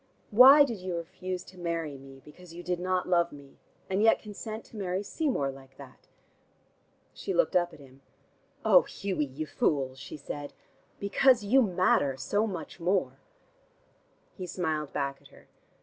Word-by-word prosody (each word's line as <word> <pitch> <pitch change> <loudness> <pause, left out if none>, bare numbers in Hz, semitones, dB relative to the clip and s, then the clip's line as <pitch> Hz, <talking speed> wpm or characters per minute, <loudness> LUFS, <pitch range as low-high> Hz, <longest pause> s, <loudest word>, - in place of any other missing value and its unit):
Why 265 +7 +9
did 235 -7 -3
you 180 -1 -4
refuse 180 +2 -5
to 185 -1 -15
marry 165 -4 -3
me, 135 0 -13
because 170 +2 -14
you 175 - -8
did 180 -1 -2
not 185 0 -1
love 170 -1 +2
me, 140 -1 -14 0.3
and 190 +2 0
yet 225 +1 +5
consent 215 +1 -8
to - - -16
marry 190 -1 -2
Seymour 245 - -1
like 135 0 -15
that?" 135 -2 -14 1.1
She - - -4
looked - - +2
up 175 -1 +3
at - - -14
him. 135 -1 -17 0.6
"Oh, - - +7
Hughie, 190 - -3
you 140 +3 -6
fool," 140 -3 0
she 135 +3 -9
said. 145 0 -7 0.5
"Because 235 +4 +3
you 250 +7 +4
matter 180 - +2
so 205 +11 0
much 180 -3 -7
more." 180 +3 0 1.1
He 185 -2 -7
smiled 160 -5 -2
back 140 -1 -3
at - - -17
her. - - -19
175 Hz, 165 wpm, -29 LUFS, 145-200 Hz, 1.1 s, Why